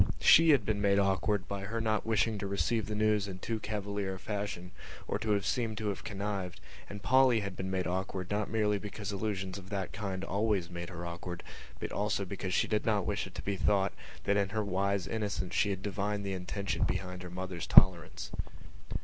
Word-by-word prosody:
She 165 +1 +7
had 135 -9 +5
been 105 -2 0
made 100 -1 +4
awkward 100 0 +2
by 100 -1 -4
her 115 +3 -2
not 110 -1 0
wishing 110 -1 +2
to 100 - -3
receive 100 +2 0
the 105 - -3
news 105 -1 +2
in 95 -2 -6
too 110 +3 -3
cavalier 100 -2 -3
a - - -9
fashion 100 -4 -4 0.4
or - - -1
to 105 -2 +2
seem 115 -3 0
to 105 -1 -2
have 100 - -4
connived 100 -3 -3 0.3
and 100 0 -8
Polly 130 -3 +5
had 100 -2 -4
been 95 +1 -3
made 95 -1 0
awkward 95 +1 -2
not 105 +1 0
merely 105 -2 +2
because 105 0 -5
allusions 100 -2 -2
of 95 -1 -13
that 100 -2 -3
kind 95 -2 -3
always 100 -3 0
made 85 0 -5
her 85 -1 -6
awkward 85 +1 -6 0.4
but - - -4
also 100 -1 0
because 95 -1 -3
she - - +3
did 105 -1 +1
not 105 -4 +1
wish 105 -1 -1
it 95 - -14
to - - -5
be 100 -1 -1
thought 100 0 +2 0.3
that 100 - +2
in 100 -1 +2
her 105 0 -1
wise 100 -1 0
innocence 105 -4 -2
she 105 - +3
had 95 -1 -3
divined 100 0 -2
the 100 - -2
intention 95 +2 -3
behind 90 0 -2
her 90 - -7
mother's 90 -1 -5
tolerance. 90 -4 +5
100 Hz, 210 wpm, -32 LUFS, 95-105 Hz, 0.4 s, She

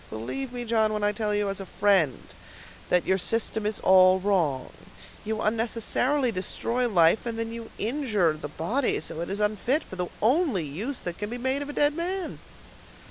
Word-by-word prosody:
Believe 240 - -5
me, 245 -1 -5
John, 220 -2 +2
when 210 -1 -2
I 205 - +3
tell 210 0 -2
you 205 0 0
as 195 0 -3
a 195 - -6
friend 190 -10 +2 0.7
that 180 -1 +3
your 190 0 +2
system 220 +1 0
is 215 - -2
all 185 0 +6
wrong; 175 -9 0 0.5
you 220 0 -3
unnecessarily 235 +4 +1
destroy 235 +5 -1
life, 175 +3 +4
and 230 -1 -3
then 225 0 -3
you 230 -1 -7
injure 215 - +1
the 155 -1 -6
body 220 - 0
so 160 - -3
that - - -3
it 170 - -4
is 200 +2 -3
unfit 215 - 0
for 185 - -10
the 180 -1 -2
only 250 - +2
use 200 - -4
that 175 -1 -5
can 205 0 -3
be 240 - -4
made 260 +3 -1
of 285 - -5
a - - -5
dead 290 0 +3
man." 360 +2 -3
215 Hz, 195 wpm, -26 LUFS, 185-245 Hz, 0.7 s, all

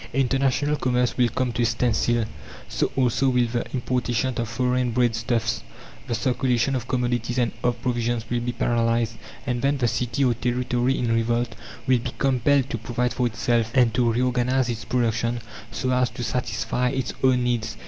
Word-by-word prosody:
International 135 +2 +1
commerce 125 -2 +1
will 125 -2 +3
come 125 +2 -1
to 120 - -2
a - - +3
standstill; 120 0 +1 0.4
so - - -1
also 130 +1 +2
will 125 -1 +3
the 120 +1 -3
importation 125 -1 -1
of 115 -2 -2
foreign 125 +1 +1
bread 120 0 +2
stuffs; 115 0 -1 0.5
the 120 - -1
circulation 125 +2 +1
of 120 -2 -3
commodities 120 -1 -1
and 120 -2 +2
of 120 -1 +1
provisions 120 -2 -1
will 120 +1 0
be 120 +1 -2
paralyzed. 115 -1 +1 0.3
And 125 -2 -1
then, 140 +1 +2
the 125 -3 +1
city 125 +4 0
or 125 - +3
territory 125 +1 0
in 120 -2 0
revolt 115 +1 0 0.3
will 130 -2 +3
be 125 +1 -5
compelled 135 +1 +2
to 115 - -2
provide 120 +2 -1
for 125 -1 +1
itself, 115 0 0
and 120 -4 +4
to 120 -1 +2
reorganize 125 +1 +1
its 115 -1 -4
production, 120 -1 0 0.3
so 130 +2 -2
as 125 -1 +2
to 120 +2 -6
satisfy 115 +1 -1
its 135 0 -2
own 130 -1 +4
needs. 115 -2 -1
120 Hz, 180 wpm, -24 LUFS, 115-125 Hz, 0.5 s, and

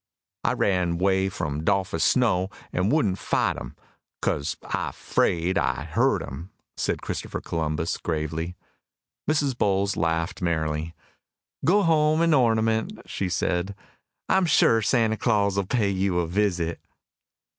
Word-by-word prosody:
"I - - +2
ran 90 -3 +1
'way 95 +1 +2
from 75 -5 -3
'Dolphus 95 -3 +1
Snow, 95 -7 +2 0.2
an' 90 +3 +1
wouldn't 110 -11 +1
fight - - 0
him, - - -8 0.4
'cause 70 +1 -1
I - - -2
'fraid 85 +2 +1
I - - -1
hurt - - +1
him," 80 +8 -8 0.3
said - - -2
Christopher, - - -4
gravely. 80 +1 -2 0.7
Mrs. 145 -4 +1
Bowles 100 -2 +1
laughed 80 0 -1
merrily. 80 -1 -1 0.7
"Go 200 +4 +4
home 155 -1 +3
and 165 -1 +4
ornament," 115 -4 +2
she 95 - -3
said. 90 +3 -1 0.5
"I - - +3
am 190 -2 +2
sure 115 -7 +4
Santa 110 0 +2
Claus 100 -3 +1
will 100 -2 -1
pay 105 -3 +1
you 95 -1 0
a 85 - +1
visit." 85 -2 0
95 Hz, 135 wpm, -25 LUFS, 85-110 Hz, 0.7 s, Go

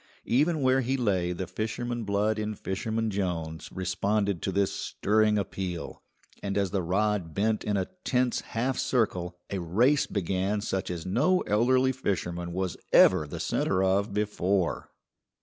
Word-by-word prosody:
Even 150 +5 +2
where 130 0 +3
he 130 +2 0
lay 95 -8 +1
the 90 +1 -3
fisherman 115 +4 -3
blood 105 +2 +1
in 105 0 -2
Fisherman 110 +4 -2
Jones 85 -5 -3
responded 100 +1 0
to 95 - -1
this 100 0 +1
stirring 105 +1 +1
appeal, 95 -3 -4 0.4
and 100 0 -2
as 100 -2 +1
the 100 -2 0
rod 95 -1 0
bent 110 +2 +1
in 105 -1 0
a 95 - -1 0.2
tense 125 -2 +1 0.2
half 130 +3 0
circle 95 -10 0
a 100 - -1
race 120 - +2
began 95 +1 -1
such 95 -2 -2
as 85 -3 -4
no 155 - +2
elderly 130 +5 +3
fisherman 90 -8 -3
was 95 0 -2
ever 75 - +6
the - - -6
centre 95 0 0
of 95 +2 +2
before. 100 -3 0
100 Hz, 150 wpm, -28 LUFS, 95-115 Hz, 0.4 s, ever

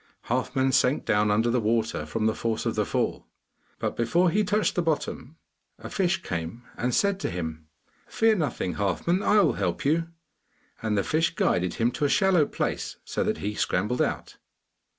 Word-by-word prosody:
Halfman 130 +2 +1
sank 130 +1 +2
down 105 -1 +2
under 110 +3 +2
the 125 0 +1
water 110 -7 0
from 110 +7 -2
the 110 - +3
force 115 0 -2
of - - 0
the - - -1
fall, - - -1 0.5
but - - -2
before 170 +10 +2
he 210 +4 +2
touched 210 +1 +1
the 175 - +1
bottom 160 -2 -3 0.4
a - - -9
fish 190 -1 0
came 85 +7 -4
and 125 +1 -1
said 200 -1 +2
to - - -2
him, 80 -3 -5 0.4
'Fear 225 -1 +2
nothing, 125 - -2
Halfman; 135 - 0
I 210 0 +4
will 155 -10 +3
help 95 +1 -2
you.' 165 +3 +2 0.7
And 110 -2 0
the 100 - +2
fish 165 +1 0
guided 90 0 +1
him 115 +1 +1
to 145 - -1
a - - +2
shallow 170 +2 +3
place, - - -3
so - - -1
that - - -1
he 105 - -1
scrambled 105 +4 0
out. - - -2
125 Hz, 185 wpm, -26 LUFS, 105-165 Hz, 0.7 s, I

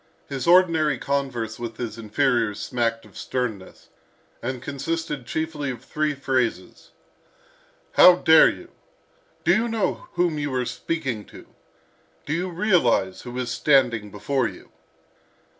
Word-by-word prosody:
His 135 -1 -4
ordinary 165 -5 +4
converse 125 -5 -3
with 115 -2 -6
his 115 -2 -5
inferiors 115 -1 0
smacked 115 -2 -2
of 105 - -19
sternness, 115 -7 -5 0.5
and 130 +1 -3
consisted 145 0 -4
chiefly 155 -2 -3
of 125 -1 -7
three 155 -1 -1
phrases: 130 -3 -2 1.0
"How 180 - +8
dare 160 -2 +6
you?" 350 -1 -9 0.7
"Do - - +4
you 225 +2 +1
know 225 -3 -2
whom 170 -4 0
you 145 -1 -2
are 125 -1 0
speaking 135 -7 -3
to?" - - -14 0.8
"Do 145 - -2
you 180 +3 -1
realise 165 - +1
who 125 0 -8
is 125 -2 -2
standing 120 -7 +2
before 120 +6 -1
you?" - - -12
135 Hz, 130 wpm, -24 LUFS, 120-160 Hz, 1.0 s, How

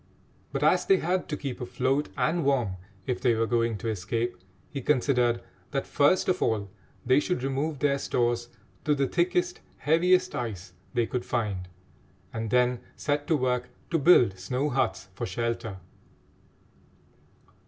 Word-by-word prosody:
But - - -2
as - - +3
they 390 - +6
had 180 +1 -1
to 150 - -2
keep 135 -4 -5
afloat 130 +4 0
and 170 +1 +1
warm 125 -9 +1 0.3
if 125 - -2
they 120 -3 +3
were 115 +1 +1
going 115 -1 +1
to 110 - -5
escape, 115 +3 -1 0.4
he 140 - -4
considered 125 -3 +2 0.3
that 135 -1 -2
first 145 +6 +3
of 185 0 +1
all 100 -3 0 0.3
they 130 +3 +5
should 150 -3 -1
remove 140 +3 -1
their 140 0 +1
stores 120 -2 0 0.4
to 150 -1 +3
the 140 -1 +1
thickest, 175 +2 +1 0.2
heaviest 180 +5 +3
ice 100 -7 -5 0.2
they 120 -1 +3
could 125 +2 -3
find, 105 -7 -2 0.7
and 110 -1 -3
then 125 +1 +3 0.2
set 145 0 -1
to 160 - +3
work 125 -1 0 0.2
to 165 - +2
build 125 - +5
snow 125 +10 -1
huts 130 -6 0
for 100 - -4
shelter. 115 0 -3
125 Hz, 155 wpm, -27 LUFS, 115-145 Hz, 0.7 s, they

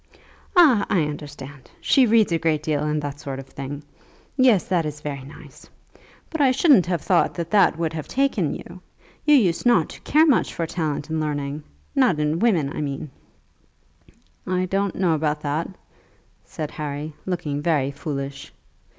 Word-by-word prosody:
"Ah, 300 - +6
I 180 - +2
understand. 145 -2 -8
She 265 -3 +4
reads 220 -3 +4
a 165 - +1
great 155 -2 0
deal, 150 -2 0
and 150 0 0
that 145 0 -5
sort 135 -1 -6
of 135 - -8
thing. 140 +2 -7 0.5
Yes; 255 -8 +4
that 175 -3 +1
is 150 -1 -5
very 145 -2 -5
nice. 140 +3 -14 0.6
But 320 - -2
I 275 - +5
shouldn't 255 - +4
have 175 -4 -1
thought 180 -3 +2
that 170 -1 -4
that 200 -6 +4
would 165 -1 -2
have 155 -2 -5
taken 275 +1 0
you. - - -11 0.4
You 300 -1 +6
used 185 -11 +2
not 200 -10 +3
to - - -11
care 310 +3 +4
much 285 -7 +2
for 165 - -1
talent 160 -3 -3
and 160 - 0
learning, 145 -1 -3 0.3
not 250 - +3
in 150 +2 0
women 175 -12 +1
I - - -3
mean." 140 0 -4 1.4
"I 185 0 0
don't 195 +1 -1
know 180 -3 +2
about 150 -1 -1
that," 150 +3 -2 0.8
said 155 -2 -6
Harry, 150 +1 -5
looking 160 -6 -2
very 145 -4 +1
foolish. 140 -2 -6
160 Hz, 170 wpm, -23 LUFS, 145-195 Hz, 1.4 s, Ah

